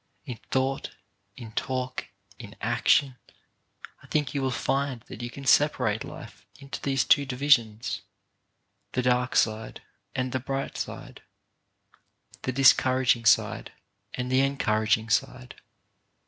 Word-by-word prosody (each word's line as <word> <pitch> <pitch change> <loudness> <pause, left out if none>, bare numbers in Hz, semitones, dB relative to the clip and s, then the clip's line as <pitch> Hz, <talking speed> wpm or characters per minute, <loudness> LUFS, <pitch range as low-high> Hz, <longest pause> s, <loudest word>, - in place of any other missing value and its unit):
In 120 -3 -7
thought, 135 +1 -1 0.4
in 115 -3 -9
talk, 130 +2 -3 0.3
in 105 -4 -10
action, 125 +3 +2 0.8
I - - -17
think 145 -4 -1
you 140 - -1
will 135 - 0
find 135 -1 -1
that 115 - -10
you 120 - -4
can 140 +3 -10
separate 115 -7 +3
life - - -11
into 140 -1 -8
these 135 -2 +1
two 145 - +5
divisions 125 -4 +1 0.5
— - - -49
the 125 - 0
dark 125 0 +1
side 110 0 0 0.3
and 130 -1 -1
the 130 - -1
bright 135 +2 -4
side, - - -7 1.2
the 130 - -2
discouraging 130 -2 +4
side - - +2 0.4
and 125 0 -3
the 130 - +4
encouraging 110 -5 +1
side. 125 +2 -2
130 Hz, 130 wpm, -27 LUFS, 120-135 Hz, 1.2 s, two